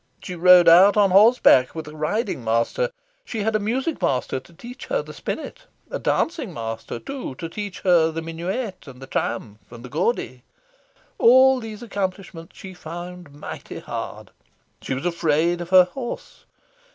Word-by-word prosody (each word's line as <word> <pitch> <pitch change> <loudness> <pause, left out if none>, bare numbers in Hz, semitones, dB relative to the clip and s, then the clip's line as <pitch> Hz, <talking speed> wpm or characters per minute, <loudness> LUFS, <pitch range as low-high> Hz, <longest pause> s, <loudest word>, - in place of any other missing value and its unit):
She 180 - -6
rode 180 0 +6
out 185 +5 +7
on 200 -2 +4
horse 215 +6 +6
back, 130 - +4
with 160 -2 -6
a 150 - -10
riding 155 - -2
master. 115 - 0 0.3
She 225 - -4
had 220 +1 0
a - - +3
music 255 +9 -2
master 130 0 0
to 130 +6 -20
teach 240 +9 -11
her - - -1
the - - -11
spinet; - - -6 0.2
a - - -3
dancing 315 - -1
master, 115 0 -5
too, 265 - -7
to 165 - -6
teach 200 +2 -7
her 170 -3 +4
the 165 0 -5
Minuet 185 - -5
and 130 -2 -12
the 135 - -9
Triumph 110 -5 -4
and 120 +1 -11
the - - -9
Gaudy. 145 - -2 0.8
All 260 +2 +6
these 225 -1 -8
accomplishments 190 -5 -5
she 190 -1 -9
found 175 -1 -9
mighty 145 +1 -9
hard. - - -7 0.5
She 130 - -3
was 135 - -5
afraid 170 0 +1
of 175 - -7
her 185 0 +8
horse. 240 +7 -8
180 Hz, 170 wpm, -23 LUFS, 155-215 Hz, 0.8 s, her